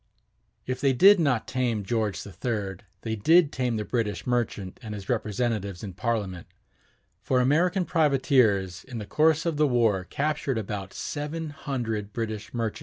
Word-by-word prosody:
If 130 0 -3
they 135 -2 +3
did 195 +9 +7
not 140 -8 +1
tame 120 -5 -1
George 110 -1 -1
III, 100 -2 -3 0.2
they 110 -1 -2
did 160 - +4
tame 125 -4 -1
the 105 - -3
British 110 -4 -2
merchant 115 -6 -2
and 110 -3 -6
his 100 -1 -9
representatives 110 -4 -1
in 100 -3 -6
Parliament; 100 -4 -2 0.7
for 130 - +1
American 175 +8 +2
privateers 130 - +2
in 125 -3 -8
the 105 - -5
course 155 +7 +2
of 165 -3 0
the 150 0 +4
war 115 -7 +2
captured 140 0 -1
about 100 -2 -4
seven 150 +2 -4
hundred 115 -9 -4
British 110 -2 -4
merchantmen. 115 -3 -2
120 Hz, 155 wpm, -26 LUFS, 105-140 Hz, 0.7 s, did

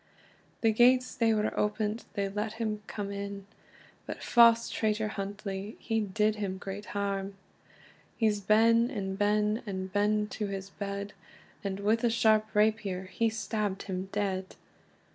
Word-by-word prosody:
The 225 - +4
gates 250 +3 +4
they 230 -1 +2
were 215 -1 0
opent, 210 +1 -1
they 200 -2 0
let 210 +2 -3
him 215 -2 -3
come 200 -1 -4
in, 200 0 -5 0.6
But - - -6
fause 230 -1 +6
traitor 215 0 0
Huntly, 200 0 -5
he 225 -1 -1
did 210 +1 +1
him 195 -2 -3
great 195 +2 -6
harm. 200 -1 -2 0.8
He's 215 -3 +2
ben 230 +4 +4
and 195 -7 -3
ben, 210 +2 +1
and 190 -1 -4
ben 210 +1 +2
to 210 0 -3
his 195 0 -5
bed, 200 0 -5 0.5
And 200 0 -3
with 220 +3 +2
a 240 - +4
sharp 220 -1 +3
rapier 210 -3 +2
he 225 +5 0
stabbed 215 -3 -2
him 190 -1 -4
dead. 190 -2 -2
210 Hz, 145 wpm, -30 LUFS, 200-220 Hz, 0.8 s, fause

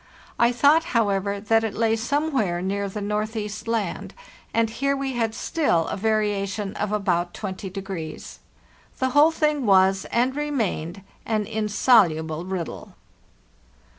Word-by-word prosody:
I 235 0 +5
thought, 290 +6 +4
however, 200 -2 0
that 225 +2 +2
it 220 -2 -3
lay 225 0 +2
somewhere 245 - 0
near 200 +2 -2
the 210 +2 -5
Northeast 210 +1 -3
Land; 225 -6 -2 0.4
and 230 0 +2
here 275 +5 -1
we 270 -1 -3
had 225 -2 -1
still 230 - +1
a - - -2
variation 205 -1 -1
of 210 0 -2
about 180 -4 0
20. 190 -1 -5
The 195 +6 -7
whole 290 +4 +6
thing 300 -5 0
was, 190 0 +4
and 250 +3 0
remained, 215 - -2 0.2
an 215 -2 -1
insoluble 200 -7 +2
riddle. 185 -3 -5
210 Hz, 130 wpm, -24 LUFS, 195-235 Hz, 0.4 s, whole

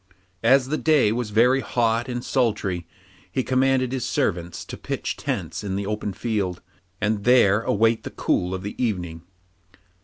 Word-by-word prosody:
As 130 +3 +4
the 155 - -1
day 150 -9 +4
was 120 -1 -2
very 120 +5 +4
hot 120 -1 0
and 120 0 -4
sultry 105 -9 0 0.4
he 130 - 0
commanded 130 0 +2
his 130 -2 -2
servants 90 - -2
to - - -7
pitch - - -4
tents - - -4
in 95 -2 -3
the 100 0 -2
open 105 0 -3
field, 100 -3 -2 0.4
and 105 -1 0
there 115 -4 +5
await 115 +1 +2
the - - -6
cool 90 +1 -1
of 95 - -6
the 100 - -4
evening. 90 -7 -2
110 Hz, 160 wpm, -24 LUFS, 100-125 Hz, 0.4 s, there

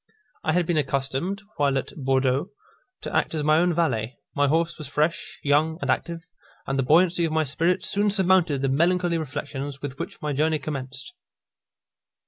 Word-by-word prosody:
I 155 - +1
had 175 0 +2
been 170 -1 0
accustomed, 140 +8 -2
while 140 -2 +2
at 135 - -4
Bourdeaux, 135 +3 +1 0.5
to - - -5
act - - +1
as 150 - -1
my 155 +1 +4
own 175 +1 +3
valet; 130 -8 0 0.2
my 145 0 +3
horse 165 +3 0
was 150 - -6
fresh, 150 +4 -1
young, 150 +3 +2
and - - 0
active, 170 -1 -2 0.4
and 135 0 -1
the - - +2
buoyancy 170 +5 +4
of 165 - 0
my 160 0 +2
spirits 165 +5 0
soon 205 +1 +2
surmounted 185 -7 +3
the - - +2
melancholy 170 +4 +2
reflections 145 -1 -5
with 140 -1 -6
which - - -6
my 150 -1 -2
journey 155 +3 +2
commenced. 135 - -6
155 Hz, 175 wpm, -25 LUFS, 135-170 Hz, 0.5 s, my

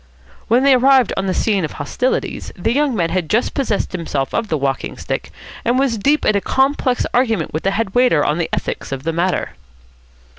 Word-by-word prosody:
When 240 +4 +3
they 275 -1 +6
arrived 260 -1 +4
on 195 - -2
the 185 - 0
scene 205 -5 +1
of 155 - -3
hostilities, 250 - -2
the 225 +6 -1
young 285 -2 +1
man 170 -5 0
had 180 -4 -1
just 230 +3 +1
possessed 235 -7 -1
himself 155 -6 -3
of 230 - -1
the 160 - 0
walking 135 -1 -2
stick, - - -4 0.3
and 240 +2 +1
was 260 -5 +1
deep 290 +8 +2
in 215 - +3
a 200 - +1
complex 265 +2 +1
argument 225 -9 +1
with 155 - -2
the 195 - +1
head 195 0 -2
waiter 245 -12 +3
on 150 +3 0
the 165 - -1
ethics - - -3
of 135 -1 -4
the 165 +1 -1
matter. 175 +2 -1
210 Hz, 210 wpm, -18 LUFS, 165-255 Hz, 0.3 s, they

